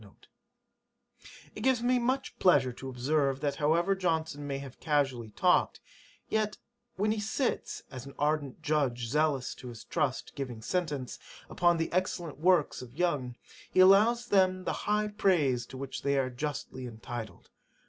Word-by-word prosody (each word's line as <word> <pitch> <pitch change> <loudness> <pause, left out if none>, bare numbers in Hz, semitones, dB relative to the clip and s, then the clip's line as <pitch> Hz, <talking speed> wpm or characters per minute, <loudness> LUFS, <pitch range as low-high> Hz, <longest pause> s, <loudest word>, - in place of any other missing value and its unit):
' - - -22
'It - - -8
gives 260 -3 +2
me 250 +1 +3
much 260 +3 -1
pleasure 140 -9 +4
to 135 +2 -8
observe, 135 +2 0
that 145 0 -1
however 170 +5 +2
Johnson 160 -6 -1
may 140 -1 -2
have 135 -2 -9
casually 135 -7 0
talked, 180 - +2 0.5
yet 215 -1 0 0.4
when 210 +2 +1
he 220 - -1
sits, 220 +5 -2
as 130 0 -8
"an 140 - -11
ardent 145 -2 -1
judge 135 -6 0
zealous 150 -2 +1
to 125 - -11
his 115 -3 -9
trust, - - -2
giving 125 -5 -5
sentence" 150 -5 -2 0.3
upon 175 0 +3
the 165 0 -2
excellent 175 -5 -2
works 175 -5 +3
of 125 0 -11
Young, 145 -9 0 0.4
he - - +1
allows 215 +6 +6
them 185 -4 +3
the - - -1 0.2
high 210 0 +2
praise 150 -12 +2
to 130 - -9
which 135 0 -5
they 140 0 +1
are 130 -1 0
justly 130 -1 -5
entitled. 115 -1 -8
150 Hz, 160 wpm, -30 LUFS, 130-185 Hz, 0.5 s, allows